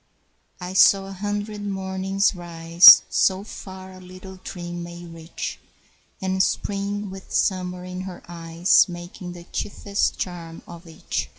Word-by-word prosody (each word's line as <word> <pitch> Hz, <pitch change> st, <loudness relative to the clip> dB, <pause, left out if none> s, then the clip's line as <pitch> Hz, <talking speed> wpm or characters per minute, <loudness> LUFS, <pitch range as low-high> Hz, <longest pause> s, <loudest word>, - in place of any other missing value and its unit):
I 180 Hz, 0 st, -6 dB
saw 195 Hz, +1 st, +5 dB
a 195 Hz, -, -9 dB
hundred 205 Hz, +2 st, -4 dB
mornings 195 Hz, 0 st, -1 dB
rise, 170 Hz, -1 st, +7 dB
So 190 Hz, 0 st, +1 dB
far 190 Hz, -2 st, -10 dB
a 185 Hz, -, -13 dB
little 185 Hz, +1 st, -12 dB
dream 175 Hz, -1 st, -7 dB
may 170 Hz, 0 st, -9 dB
reach, 165 Hz, -1 st, -7 dB, 0.6 s
And 190 Hz, 0 st, 0 dB
Spring 200 Hz, +1 st, -2 dB
with 190 Hz, 0 st, -11 dB
Summer 180 Hz, -2 st, -1 dB
in 180 Hz, 0 st, -6 dB
her 185 Hz, -1 st, -8 dB
eyes 170 Hz, +2 st, +2 dB
Making 175 Hz, +1 st, -8 dB
the 175 Hz, -1 st, -11 dB
chiefest 200 Hz, +2 st, -2 dB
charm 170 Hz, -2 st, -6 dB
of 170 Hz, 0 st, -12 dB
each. 165 Hz, -, -4 dB
185 Hz, 135 wpm, -23 LUFS, 175-195 Hz, 0.6 s, rise